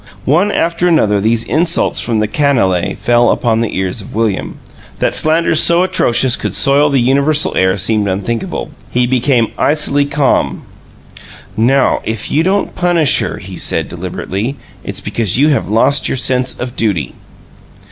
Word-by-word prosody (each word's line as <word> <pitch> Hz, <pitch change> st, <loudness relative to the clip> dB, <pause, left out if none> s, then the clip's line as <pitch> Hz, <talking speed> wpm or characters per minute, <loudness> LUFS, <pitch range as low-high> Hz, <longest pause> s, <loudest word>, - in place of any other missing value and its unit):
One 175 Hz, +9 st, +2 dB
after 170 Hz, 0 st, 0 dB
another 105 Hz, -, +2 dB
these 115 Hz, +2 st, +1 dB
insults 165 Hz, +7 st, +1 dB
from 115 Hz, -3 st, -1 dB
the 105 Hz, -, 0 dB
canaille 105 Hz, -, 0 dB
fell 120 Hz, 0 st, +2 dB
upon 115 Hz, -2 st, 0 dB
the 115 Hz, -, -3 dB
ears 95 Hz, +2 st, -2 dB
of 100 Hz, -, -11 dB
William. 110 Hz, -3 st, -2 dB, 0.4 s
That -, -, -1 dB
slanders 160 Hz, 0 st, +2 dB
so 170 Hz, +1 st, +4 dB
atrocious 130 Hz, -9 st, +2 dB
could -, -, -5 dB
soil 145 Hz, +1 st, +3 dB
the 140 Hz, -, +1 dB
universal 140 Hz, +5 st, +1 dB
air 95 Hz, +1 st, +1 dB
seemed 105 Hz, +2 st, 0 dB
unthinkable. 100 Hz, +5 st, -4 dB, 0.2 s
He 125 Hz, 0 st, 0 dB
became 125 Hz, -1 st, +1 dB
icily 145 Hz, -1 st, +2 dB
calm. 140 Hz, -1 st, -1 dB, 0.9 s
"NOW 130 Hz, +5 st, +2 dB
if 110 Hz, -1 st, -5 dB
you 155 Hz, -, +2 dB
don't 195 Hz, +4 st, -1 dB
punish 175 Hz, -6 st, +2 dB
her," -, -, -3 dB
he -, -, -10 dB
said, -, -, 0 dB
deliberately, 110 Hz, +9 st, -5 dB, 0.3 s
"it's -, -, -6 dB
because 110 Hz, -3 st, -1 dB
you 145 Hz, +3 st, +3 dB
have 140 Hz, -, -1 dB
lost 115 Hz, +6 st, +2 dB
your -, -, -2 dB
sense 130 Hz, 0 st, 0 dB
of 125 Hz, 0 st, -6 dB
duty!" 100 Hz, -, -1 dB
125 Hz, 155 wpm, -13 LUFS, 110-150 Hz, 0.9 s, so